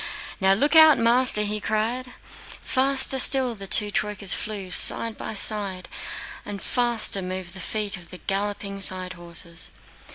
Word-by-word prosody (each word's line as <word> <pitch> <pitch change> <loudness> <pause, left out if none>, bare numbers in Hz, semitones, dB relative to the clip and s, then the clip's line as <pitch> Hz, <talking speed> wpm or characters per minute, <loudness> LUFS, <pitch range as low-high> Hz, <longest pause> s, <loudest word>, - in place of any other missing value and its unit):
"Now, 190 -1 +3
look 290 +11 0
out, 315 -2 +7
master!" 230 -2 +3
he 210 0 -3
cried. 235 +5 -3
Faster 265 0 0
still 260 -1 +2
the 200 -3 -10
two 210 +2 +6
troykas 205 -2 -2
flew 200 -4 -5
side 225 +4 +4
by 220 - -8
side, 200 -3 0 0.6
and 205 -1 -8
faster 235 -3 -1
moved 185 -1 -7
the 190 - -11
feet 205 +2 -4
of 175 -1 -15
the 180 - -11
galloping 200 +1 -5
side 185 -1 +2
horses. 170 -1 -3
205 Hz, 150 wpm, -23 LUFS, 190-235 Hz, 0.6 s, out